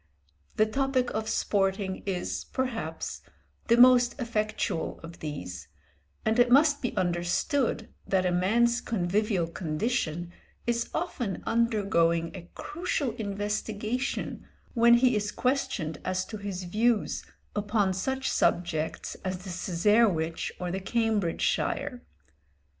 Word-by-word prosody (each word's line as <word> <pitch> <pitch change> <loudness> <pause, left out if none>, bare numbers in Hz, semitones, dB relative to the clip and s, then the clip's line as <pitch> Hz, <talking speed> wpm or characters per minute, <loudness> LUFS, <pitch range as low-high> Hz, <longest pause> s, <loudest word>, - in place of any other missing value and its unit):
The 215 - +4
topic 260 +2 0
of 220 0 -2
sporting 195 -2 0
is, 185 -2 -2
perhaps, 225 -11 -3 0.5
the 235 - +5
most 250 +1 +6
effectual 215 -8 -1
of 165 +1 -10
these, 90 - -6 0.6
and 220 +2 +2
it 245 0 +5
must 290 +3 +5
be 245 - -3
understood 185 - 0 0.2
that 190 -1 +2
a 180 - +2
man's 235 +7 +3
convivial 200 -2 0
condition 175 0 -2 0.3
is 235 0 0
often 245 - -2
undergoing 200 -8 +2
a 175 -2 -9
crucial 300 -5 -2
investigation 215 +3 -3 0.3
when 235 0 +6
he 245 0 +4
is 205 -1 -1
questioned 230 - -1
as 185 0 -1
to 215 - -7
his 200 -3 -5
views 215 +5 +1 0.3
upon 205 -2 +1
such 265 +8 -2
subjects 160 -2 0
as 185 -1 -3
the 190 - -6
Cesarewitch 175 -2 +2
or 180 -1 -3
the 190 - -2
Cambridgeshire. 225 +3 0
210 Hz, 115 wpm, -28 LUFS, 180-235 Hz, 0.6 s, most